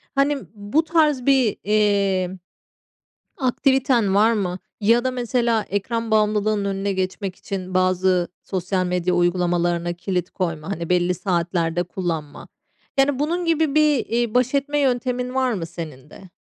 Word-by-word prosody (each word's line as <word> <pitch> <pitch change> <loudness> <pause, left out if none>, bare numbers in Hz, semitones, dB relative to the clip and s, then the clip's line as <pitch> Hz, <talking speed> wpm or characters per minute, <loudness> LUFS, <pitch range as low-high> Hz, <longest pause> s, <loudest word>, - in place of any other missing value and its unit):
Hani, 280 +1 +2 0.2
bu 210 +9 0
tarz 305 -6 +2
bir, 265 -6 +3
iii, 200 -3 +2 1.1
aktiviten 260 -5 +2
var 220 +3 +5
mı? 185 -4 -2 0.2
Ya 230 +3 +4
da 260 - 0
mesela 240 -3 0
ekran 225 +3 -2
bağımlılığının 210 -1 +2
önüne 195 0 -1
geçmek 190 0 -3
için 185 -1 -6
bazı 185 -1 +2 0.2
sosyal 185 0 -1
medya 180 0 0
uygulamalarına 175 -1 +1
kilit 180 0 -3
koyma, 165 -3 -3
hani, 170 -4 -4
belli 180 0 +2
saatlerde 175 -1 -1
kullanma. 170 -4 -5 0.5
Yani, 270 -1 +3
bunun 340 +4 -1
gibi 320 -3 +1
bir, 300 -4 +3
iii, 235 -1 -1
baş 250 +1 +2
etme 290 +1 0
yöntemin 250 -2 0
var 260 -2 +1
mı 180 -6 -3
senin 155 -5 -9
de? 190 +3 -14
200 Hz, 140 wpm, -22 LUFS, 180-250 Hz, 1.1 s, var